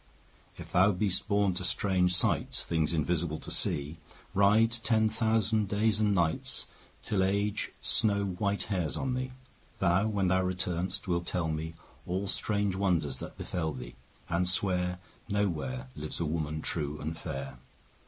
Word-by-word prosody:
If - - -9
thou 95 +3 +5
be'st 95 0 +1
born 100 -2 +3
to 90 - -3
strange 90 -1 +2
sights, - - +1
10 - - -15
Things 80 -1 +1
invisible 80 0 0
to - - -8
see, 75 +3 -1 0.4
Ride 105 +3 +5
ten 110 -1 +2
thousand 110 -1 +1
days 105 +2 +2
and 105 -2 +3
nights 85 -3 0 0.4
Till 105 -3 0
Age 100 +2 0
snow 100 -2 +2
white 100 +2 -1
hairs 90 -7 -1
on 130 -2 -1
thee; 130 +1 -2 0.5
Thou, 90 +5 +3
when 100 -3 +1
thou 95 +1 +3
return'st, 90 +1 -1
wilt 85 -1 0
tell 85 -3 0
me 80 +1 -3 0.3
All 95 +3 -1
strange 100 -1 0
wonders 85 -9 +1
that - - -8
befell 80 -3 -2
thee, - - -8 0.3
15 85 - -2
And 90 +1 +2
swear 90 -1 +1 0.3
No 105 0 +2
where 130 - -3
Lives 75 +1 -5
a 85 - 0
woman 75 -1 -2
true 75 -2 -3
and 80 +2 -3
fair. 70 -5 -6
95 Hz, 165 wpm, -30 LUFS, 85-105 Hz, 0.5 s, thou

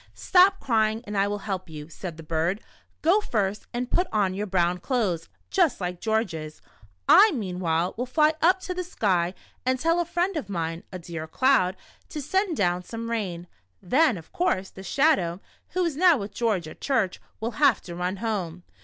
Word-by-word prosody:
"Stop 385 +1 +4
crying, 220 -3 +1
and 210 - -6
I 200 0 +2
will 205 0 -2
help 190 -4 -4
you," 150 -1 -8
said 170 0 -8
the 165 - -9
bird. 165 +5 -1 0.4
"Go 350 +7 +5
first 210 - -2
and 245 +1 -3
put 360 +1 +2
on 200 -3 +1
your 205 +2 -3
brown 180 -1 +1
clothes, 190 - -1 0.2
just 355 -6 +2
like 180 -1 -4
George's. 185 -9 -2 0.5
I, 430 - +8
meanwhile, 180 - -1
will 250 +3 -3
fly 305 +4 +3
up 370 +3 +4
to 370 - -4
the 365 0 -3
sky 185 - 0 0.3
and 255 0 +1
tell 330 +4 +2
a 345 - +1
friend 350 +3 -1
of 245 -10 -5
mine, 165 -3 -3
a 185 - -5
dear 165 -2 -7
cloud, 190 -2 +3 0.3
to 305 - -5
send 370 +3 0
down 180 -2 +1
some 230 +3 -6
rain. 185 -7 -3 0.3
Then, 255 - +3
of 160 - -12
course, 195 - 0
the 190 - -11
Shadow, 190 - +2 0.3
who 365 -1 +1
is 330 -4 -1
now 345 0 +5
with 200 -2 -6
George 210 -9 0
at 155 - -12
church, 225 -10 0 0.2
will 225 +2 -2
have 275 -8 +5
to 175 - -9
run 180 +2 -2
home. 185 -6 -3
205 Hz, 190 wpm, -26 LUFS, 180-280 Hz, 0.5 s, I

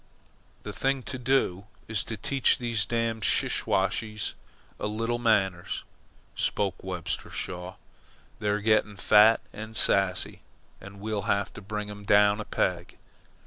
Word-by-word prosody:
"The - - -6
thing 135 -1 0
to 130 +1 -5
do 120 -7 +1 0.2
is 110 -2 +1
to 110 - -5
teach 135 +6 +2
these 115 -5 -1
damned 115 -1 -1
Siwashes 105 +2 0 0.5
a - - -2
little 115 +3 -2
manners," 95 -7 +1 0.5
spoke 95 -2 -1
Webster 90 -3 -4
Shaw. 90 0 -5 0.6
"They're 105 -1 0
getting 110 -1 +2
fat 105 +3 +6
and 110 +1 -6
sassy, 95 -2 +2 0.4
and 100 0 -12
we'll 105 -1 -3
have 100 -1 0
to - - -9
bring 105 +1 -4
them 105 0 -8
down 100 +1 +4
a - - -7
peg. 90 -1 -2
105 Hz, 135 wpm, -27 LUFS, 100-110 Hz, 0.6 s, fat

